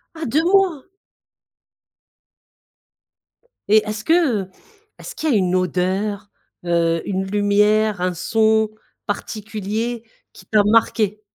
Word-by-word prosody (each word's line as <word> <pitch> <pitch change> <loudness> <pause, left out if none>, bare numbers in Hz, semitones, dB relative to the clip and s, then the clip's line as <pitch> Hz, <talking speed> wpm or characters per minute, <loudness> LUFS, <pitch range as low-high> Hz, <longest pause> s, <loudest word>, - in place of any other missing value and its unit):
Ah 320 0 -5
2 300 +6 +1
mois! 365 -5 +2 2.9
Et 215 0 +4
est-ce 215 0 -4
que, 320 - +2 0.3
heu, 185 - -14 0.5
est-ce - - -10
qu'il 315 - -2
y 275 - +3
a - - +3
une 185 -1 +1
odeur, 190 +3 -1 0.4
heu, 165 -1 +1
une 190 -1 -2
lumière, 210 0 +2
un 180 0 0
son 220 +4 +2 0.4
particulier 215 +2 -4 0.3
qui - - -16
t'a 210 -2 +3
marqué? 215 -1 +2
210 Hz, 115 wpm, -20 LUFS, 190-225 Hz, 2.9 s, Et